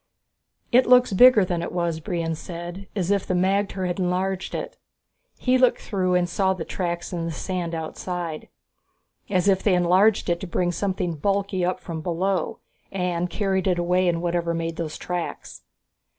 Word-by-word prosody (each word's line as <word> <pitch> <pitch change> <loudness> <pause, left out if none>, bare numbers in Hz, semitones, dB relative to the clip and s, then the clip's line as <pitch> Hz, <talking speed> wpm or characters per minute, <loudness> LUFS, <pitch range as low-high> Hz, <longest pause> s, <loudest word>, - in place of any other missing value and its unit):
"It 250 +2 +5
looks 250 -3 +5
bigger 225 -1 +7
than 175 -2 -2
it 170 - -4
was," 170 -2 -1
Brion 165 -2 -2
said, 175 +4 -7
"as 190 -2 0
if 200 -2 +2
the 185 - 0
magter 190 +1 +1
had 175 +1 -2
enlarged 185 +1 -1
it." - - -5 0.6
He 255 0 +2
looked 255 -1 +4
through 185 -3 0
and 180 -1 +2
saw 190 +1 +1
the 165 -3 -5
tracks 175 -1 -3
on 170 -1 -2
the 165 - -3
sand 170 +1 -3
outside. 165 0 -5 0.8
"As 185 -1 +1
if 190 -1 +4
they 200 - +2
had 180 0 +3
enlarged 190 +5 +4
it 170 -1 +1
to 190 - -6
bring 175 +1 0
something 180 -3 -2
bulky 195 +1 0
up 180 +1 0
from 165 -3 -6
below 180 +1 -1 0.3
and 180 -2 -1
carried 190 -1 0
it 180 -2 +2
away 180 +1 +2
in 170 -1 +1
whatever 170 -1 -1
made 165 0 -3
those 160 -2 -4
tracks!" 175 -1 -5
180 Hz, 180 wpm, -24 LUFS, 170-195 Hz, 0.8 s, bigger